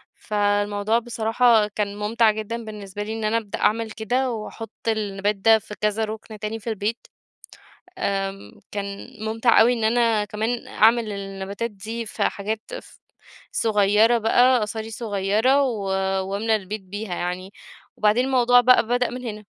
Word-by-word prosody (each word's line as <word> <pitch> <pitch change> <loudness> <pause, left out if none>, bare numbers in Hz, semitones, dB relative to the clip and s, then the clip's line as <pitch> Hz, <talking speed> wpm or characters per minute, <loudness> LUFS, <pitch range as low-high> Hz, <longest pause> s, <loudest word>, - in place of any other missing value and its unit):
فالموضوع 205 +1 0
بصراحة 230 -1 +2
كان 205 -1 -3
ممتع 220 +1 +3
جدًا 220 +2 -5
بالنسبة 205 -2 -7
لي، 215 +1 -5
إن 225 -1 -5
أنا 220 +2 +2
أبدأ 210 -3 -5
أعمل 225 +1 +1
كده 245 +4 -1
وأحط 225 0 -7 0.2
النَبات 205 -2 0
ده 220 +3 +4
في 210 - -10
كذا 210 +1 +1
رُكن 215 0 -8
تاني 215 +2 -4
في 230 - -6
البيت، 215 +2 -3 0.9
آمم 195 - -3
كان 200 -1 -5 0.2
ممتع 225 +2 +4
أوي 240 +2 +5
إن 230 -2 -3
أنا 225 -2 +2
كمان 220 +3 -3
أعمل 225 0 +3
النباتات 200 +3 -5
دي 225 +3 -6
في - - -3
حاجات 215 +2 -2 0.2
ف - - -19 0.5
صغيّرة 215 +2 +3
بقى 245 +3 +4
قصاري 220 +1 -4
صغيّرة، 220 +5 +1
و 225 -7 -1 0.5
وأملى 220 +2 +1
البيت 205 +1 -6
بيها 200 0 -5
يعني، 180 +2 -4 0.4
وبعدين 215 +4 +3
الموضوع 245 -2 +5
بقى 250 -2 +5
بدأ 245 0 +1
من 250 +1 -7
هنا. 210 -2 -6
220 Hz, 150 wpm, -23 LUFS, 205-230 Hz, 0.9 s, أوي